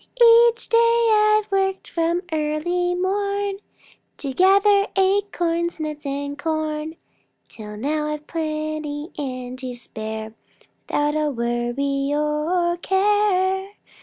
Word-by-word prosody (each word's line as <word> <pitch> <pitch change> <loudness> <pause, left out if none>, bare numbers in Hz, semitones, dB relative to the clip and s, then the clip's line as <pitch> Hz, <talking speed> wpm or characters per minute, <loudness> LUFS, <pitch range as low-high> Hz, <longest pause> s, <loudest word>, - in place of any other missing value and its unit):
Each 470 0 -8
day 465 0 +4
I've 425 -1 +3
worked 385 0 0
from 340 +2 -1
early 320 +4 0
morn 400 +1 -1 0.6
To 275 -2 -4
gather 395 +4 +4
acorns, 355 -4 0
nuts, 305 -1 -5
and 285 +1 -3
corn, 310 0 -2 0.5
Till 210 -2 -9
now 300 +6 -1
I've 300 0 -4
plenty 310 -1 -4
and 255 -3 -5
to 255 -2 -5
spare 220 -2 -6 0.5
Without 295 0 0
a 305 -1 +1
worry 250 +3 -1
or 305 +4 0
a - - -5
care. 385 0 +1
315 Hz, 110 wpm, -22 LUFS, 290-385 Hz, 0.6 s, day